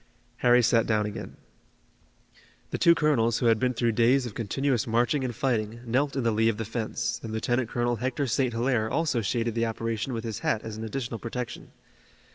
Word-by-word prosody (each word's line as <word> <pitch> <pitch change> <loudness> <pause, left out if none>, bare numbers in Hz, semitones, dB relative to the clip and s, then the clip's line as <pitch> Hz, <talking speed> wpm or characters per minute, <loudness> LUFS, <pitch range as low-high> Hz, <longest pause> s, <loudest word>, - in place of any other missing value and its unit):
Harry 125 0 +4
sat 115 0 +3
down 105 -2 +2
again. 105 - -7 1.3
The - - -2
two 170 0 +6
colonels, 120 -8 +2
who 125 - -1
had 115 -2 +4
been 125 0 0
through 115 0 +1
days 120 +4 +3
of 120 - -6
continuous 125 +3 -1
marching 120 +5 +1
and 125 -3 -3
fighting, 115 -3 -1
knelt 135 +5 0
in 135 - -1
the 115 - +2
lee 110 +1 +3
of 110 - -2
the 110 - -3
fence, 115 +1 -3
and 115 - -6
Lieutenant 120 +2 0
Colonel 120 0 0
Hector 130 +4 -1
St. 130 +1 +1
Hilaire 115 -1 0
also 150 -6 0
shaded 115 +2 -1
the 115 0 0
operation 115 +2 -3
with 115 -1 -3
his 110 -3 -4
hat 110 - 0
as 110 -1 -6
an 110 - -6
additional 115 0 -4
protection. 120 0 -6
115 Hz, 200 wpm, -27 LUFS, 110-125 Hz, 1.3 s, two